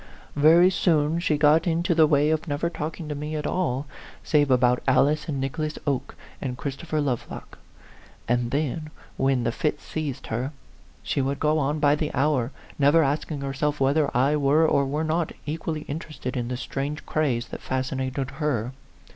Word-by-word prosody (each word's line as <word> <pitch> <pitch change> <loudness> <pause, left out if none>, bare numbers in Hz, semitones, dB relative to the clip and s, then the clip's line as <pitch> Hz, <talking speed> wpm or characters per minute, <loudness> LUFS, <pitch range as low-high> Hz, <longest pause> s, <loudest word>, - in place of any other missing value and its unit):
Very 165 +5 +6
soon 160 -3 +2
she 155 -4 +1
got 155 +3 +4
into 170 +1 +1
the 160 -1 +5
way 150 0 +3
of 160 +1 -1
never 150 +3 -1
talking 160 +1 -5
to 150 - -3
me 150 +2 -4
at 150 -1 -3
all, 145 -7 -1 0.4
save 145 -2 +2
about 125 -1 +3
Alice 150 +4 +3
and 140 -3 -2
Nicholas 150 +3 -3
Oke, 140 -4 -2 0.3
and 125 -3 -3
Christopher 155 +3 -3
Lovelock; 135 -5 -4 0.7
and 120 0 +1
then, 155 +3 -2 0.3
when 135 -2 +1
the 115 - +1
fit 150 +4 -1
seized 150 -5 -5
her, 130 +6 -2 0.5
she - - 0
would 135 +1 -1
go 155 0 +2
on 145 +1 0
by 145 -1 +4
the 150 0 -1
hour, 135 -3 +1 0.3
never 145 +3 +5
asking 145 +1 -2
herself 140 +2 -1
whether 140 +3 +2
I 140 +4 +3
were 145 +3 +4
or 140 -2 +2
were 150 +3 -1
not 160 +1 -1
equally 155 0 -3
interested 150 -3 -6
in 120 -2 -2
the 125 0 -3
strange 140 +3 -4
craze 130 -6 0
that - - -7
fascinated 130 +1 -2
her. 135 -5 -2
145 Hz, 170 wpm, -25 LUFS, 135-155 Hz, 0.7 s, Very